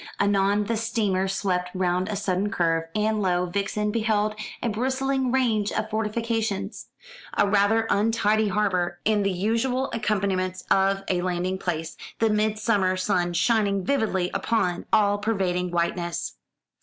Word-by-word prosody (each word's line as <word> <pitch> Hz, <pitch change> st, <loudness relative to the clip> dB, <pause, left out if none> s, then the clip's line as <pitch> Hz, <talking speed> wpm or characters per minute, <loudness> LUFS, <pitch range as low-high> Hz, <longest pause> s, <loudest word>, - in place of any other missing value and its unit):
Anon 200 Hz, 0 st, +2 dB
the 230 Hz, +2 st, -1 dB
steamer 210 Hz, -4 st, 0 dB
swept 185 Hz, -2 st, -1 dB
round 185 Hz, +1 st, 0 dB
a 210 Hz, -, -2 dB
sudden 195 Hz, 0 st, -1 dB
curve, 165 Hz, -3 st, +1 dB
and 215 Hz, 0 st, +1 dB
lo, 180 Hz, -2 st, +1 dB
Vixen 200 Hz, +3 st, -1 dB
beheld 215 Hz, -1 st, +1 dB, 0.3 s
a -, -, +1 dB
bristling 260 Hz, +3 st, 0 dB
range 225 Hz, -6 st, +1 dB
of 215 Hz, 0 st, -2 dB
fortifications, 220 Hz, -2 st, -2 dB, 0.5 s
a 205 Hz, -, +4 dB
rather 205 Hz, +3 st, +3 dB
untidy 215 Hz, 0 st, +2 dB
harbour, 185 Hz, -4 st, 0 dB
and 210 Hz, -1 st, +2 dB
the 195 Hz, -, +1 dB
usual 230 Hz, +8 st, 0 dB
accompaniments 190 Hz, -4 st, -1 dB
of 195 Hz, 0 st, +3 dB
a 180 Hz, -1 st, 0 dB
landing 180 Hz, +1 st, -1 dB
place, 165 Hz, -3 st, -3 dB, 0.2 s
the 225 Hz, -1 st, +2 dB
midsummer 210 Hz, -3 st, +1 dB
sun 185 Hz, -2 st, 0 dB
shining 200 Hz, -1 st, +1 dB
vividly 210 Hz, -10 st, 0 dB
upon 180 Hz, -6 st, 0 dB
the -, -, -12 dB
all 205 Hz, -1 st, +2 dB
pervading 190 Hz, -4 st, 0 dB
whiteness. 170 Hz, 0 st, -2 dB
205 Hz, 140 wpm, -25 LUFS, 185-220 Hz, 0.5 s, a